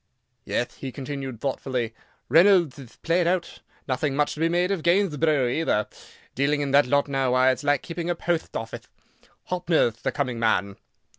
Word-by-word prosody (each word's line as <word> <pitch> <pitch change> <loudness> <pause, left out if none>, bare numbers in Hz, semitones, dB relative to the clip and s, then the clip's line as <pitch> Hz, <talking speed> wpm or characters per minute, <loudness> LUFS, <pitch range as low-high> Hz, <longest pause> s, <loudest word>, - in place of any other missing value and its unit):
"Yeth," 120 - -2
he 135 - -6
continued, 135 -3 -6
thoughtfully, 130 -3 -2 0.3
"Reynoldth 170 -2 +4
ith 125 -4 -13
played 170 +1 +2
out. 180 0 -1 0.3
Nothing 135 +1 -1
much 150 0 +1
to - - -10
be 165 +1 +2
made 175 +2 +1
of 195 -4 -1
Gainthborough, 160 -6 +2
either. 120 -5 0 0.5
Dealing 145 +2 +1
in 140 -1 -2
that 140 -1 +5
lot 140 +2 +2
now, 135 -2 0
why, 130 +1 +5
it'th 130 - -4
like 145 -2 +1
keeping 170 0 -5
a 175 - +1
potht 170 -1 -2
offith. 115 0 -5 0.7
Hoppner'th 170 -10 +1
the - - -1
coming 130 -5 -2
man." 100 -3 +1
145 Hz, 170 wpm, -25 LUFS, 130-165 Hz, 0.7 s, that